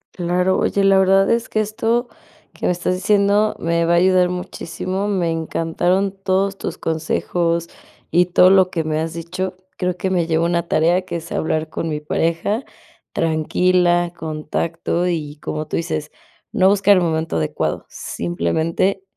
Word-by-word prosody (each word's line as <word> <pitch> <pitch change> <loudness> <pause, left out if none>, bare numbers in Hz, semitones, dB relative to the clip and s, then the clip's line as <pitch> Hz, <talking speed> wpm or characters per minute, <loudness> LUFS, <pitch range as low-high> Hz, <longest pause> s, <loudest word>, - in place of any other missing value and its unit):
Claro, 180 +1 +1
oye, 200 - +1
la 195 -1 +5
verdad 195 +1 +4
es 230 0 0
que 215 - 0
esto 225 +3 0 0.5
que - - -3
me - - +3
estás 180 +1 -1
diciendo 200 +2 +2
me 170 0 0
va 170 - +2
a - - +5
ayudar 180 0 +4
muchísimo, 180 +2 -4
me 185 -5 0
encantaron 170 +4 0
todos 195 0 0
tus - - -4
consejos 165 +1 -1 0.4
y 175 +1 +4
todo 180 +1 +5
lo 190 -1 +5
que 165 -3 -2
me 155 0 -1
has 160 0 -3
dicho, 180 +3 -4 0.2
creo 180 -1 -2
que 190 +1 -2
me 175 -3 +1
llevo 165 0 +1
una 170 0 0
tarea 170 +4 +2
que 185 -2 -7
es 170 0 -6
hablar 160 0 -1
con 165 +1 -3
mi 150 -1 -2
pareja 165 - -1 0.5
tranquila, 175 +2 +1
con 155 -2 -6
tacto, 170 +2 -1
y 155 -4 -3
como 155 0 -4
tú - - -2
dices, 155 -2 -3 0.4
no 190 0 +4
buscar 200 0 +5
el - - +3
momento 160 - -1
adecuado, 75 -1 -2
simplemente, 160 - -1
175 Hz, 165 wpm, -20 LUFS, 165-190 Hz, 0.5 s, la